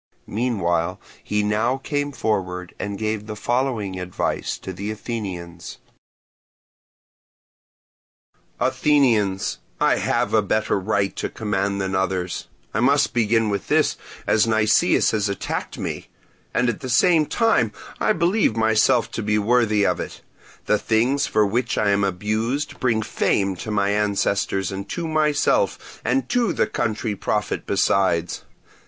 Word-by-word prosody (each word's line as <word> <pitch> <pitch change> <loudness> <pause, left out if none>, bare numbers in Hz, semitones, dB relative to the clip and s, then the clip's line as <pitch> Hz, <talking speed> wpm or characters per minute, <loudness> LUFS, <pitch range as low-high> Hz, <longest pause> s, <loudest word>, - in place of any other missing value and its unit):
Meanwhile 90 -7 -1 0.2
he 105 0 0
now 110 +5 +1
came 145 +1 -2
forward 90 -8 -2
and 100 -1 -4
gave 110 0 -2
the 110 - -5
following 115 -5 -1
advice 90 0 -2
to 95 - -7
the 100 +4 -5
Athenians: 90 -6 -6 2.8
"Athenians, 115 -10 +2 0.2
I - - +3
have 105 - 0
a 110 - +5
better 110 0 0
right 100 0 0
to - - -2
command 100 -2 -2
than 95 -1 -2
others—I 95 +2 -3
must 140 +4 +3
begin 115 -2 +2
with 100 - -3
this - - +2 0.3
as 110 +1 +3
Nicias 110 -1 +3
has 105 -2 0
attacked 100 - -4
me—and - - -5
at 120 - -1
the 130 - -6
same 155 +4 +4
time 225 -1 +2 0.3
I - - +2
believe 175 - +2
myself 110 +1 +3
to - - -3
be 105 0 +1
worthy 110 -1 +2
of - - +1
it. - - -6 0.4
The 105 - +2
things 125 +5 +1
for 105 -1 +3
which 120 +4 -1
I 105 -1 +2
am 100 0 +2
abused, 110 - -1
bring 115 -4 +1
fame 95 -2 0
to 110 - -6
my 100 -1 +1
ancestors 100 -2 0
and 100 +1 -6
to 170 -2 -3
myself, 155 - 0
and 270 - 0
to 235 -7 +1
the - - +2
country 110 -1 -2
profit 105 +1 -2
besides. 90 -3 +1
105 Hz, 135 wpm, -22 LUFS, 100-120 Hz, 2.8 s, a